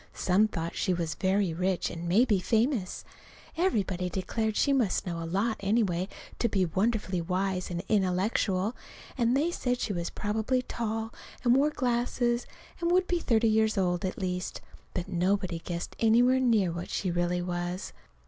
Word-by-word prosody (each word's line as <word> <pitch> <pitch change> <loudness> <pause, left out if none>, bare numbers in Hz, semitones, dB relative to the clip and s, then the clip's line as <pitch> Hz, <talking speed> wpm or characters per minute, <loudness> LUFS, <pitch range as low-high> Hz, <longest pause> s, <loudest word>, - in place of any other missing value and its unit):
Some 195 +4 +3
thought 170 -5 -4
she 185 - +1
was 165 -2 -2
very 190 +1 +1
rich, 185 +2 0
and 170 +1 -5
maybe 210 +1 +4
famous. 225 +1 0 0.5
Everybody 195 - 0
declared 215 +4 -2
she 280 - +3
must 240 -8 +1
know 170 -2 -3
a 165 - -4
lot, 210 +6 0
anyway, 195 -3 +1 0.3
and 235 - +2
be 190 -3 +2
wonderfully 190 +1 0
wise 185 +1 -1
and 175 0 -3
intellectual; 195 +1 +1 0.4
and 240 0 +2
they 320 +5 +1
said 250 -7 -1
she 205 - -1
was 170 -2 -2
probably 220 +5 -1
tall 225 -1 -3 0.3
and 245 -1 +5
wore 285 +3 +4
glasses, 240 -2 0 0.3
and 340 -1 0
would 365 +1 +4
be 355 -1 0
thirty 230 -7 +2
years 220 0 +2
old, 180 -1 +1
at 185 - -2
least. 180 -1 -3 0.4
But 180 0 -2
nobody 185 -1 0
guessed 170 0 -5
anywhere 240 +3 +4
near 225 -8 +3
what 170 +1 -5
she 185 - -1
really 175 +1 0
was. 175 +1 -3
200 Hz, 165 wpm, -29 LUFS, 180-235 Hz, 0.5 s, and